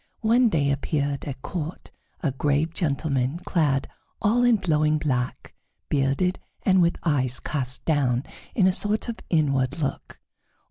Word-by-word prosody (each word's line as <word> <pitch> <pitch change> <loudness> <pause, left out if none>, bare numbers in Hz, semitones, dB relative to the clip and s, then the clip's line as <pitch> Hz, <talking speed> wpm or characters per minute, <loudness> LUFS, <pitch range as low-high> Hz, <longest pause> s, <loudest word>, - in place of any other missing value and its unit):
One 235 +2 +4
day 145 -7 +1
appeared 140 0 -1
at 130 -2 -6
court 165 -1 -5 0.3
a 150 - +1
grave 145 +4 0
gentleman 140 -3 0
clad 160 -7 0 0.3
all 225 +3 +2
in 240 -2 +5
flowing 155 -4 +2
black, 130 -4 -2 0.4
bearded, 140 +6 +1 0.2
and 190 -1 +4
with 170 0 +2
eyes 130 -6 +1
cast 130 -4 -4
down 135 -5 +2 0.3
in 200 - +4
a 190 - +5
sort 210 +5 0
of 230 - -4
inward 140 -4 +1
look. 145 -4 -4
150 Hz, 140 wpm, -25 LUFS, 135-180 Hz, 0.4 s, in